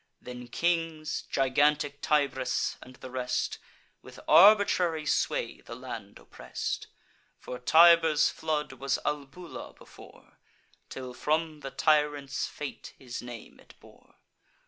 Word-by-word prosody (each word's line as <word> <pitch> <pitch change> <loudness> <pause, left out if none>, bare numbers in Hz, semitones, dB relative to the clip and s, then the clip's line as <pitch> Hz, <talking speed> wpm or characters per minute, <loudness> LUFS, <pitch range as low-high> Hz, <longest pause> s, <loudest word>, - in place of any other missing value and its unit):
Then 125 -1 -9
kings, 165 +1 -1
gigantic 145 +2 +1
Tybris, 140 -4 0
and 130 - -13
the 130 - -11
rest, 125 -1 -2 0.4
With - - -13
arbitrary 180 -5 +5
sway - - -1
the 115 - -9
land 115 -5 -8
oppress'd: - - -6 0.5
For 125 - -8
Tiber's 165 +2 +6
flood 150 -3 -2
was 135 +1 -1
Albula 150 +4 -5
before, - - -17 0.5
Till, 130 -1 -7
from 155 +3 -1
the 140 - -6
tyrant's 145 -1 +1
fate, 150 -2 -8
his 125 -3 -7
name 120 -2 -10
it - - -18
bore. - - -20
145 Hz, 115 wpm, -28 LUFS, 130-155 Hz, 0.5 s, Tiber's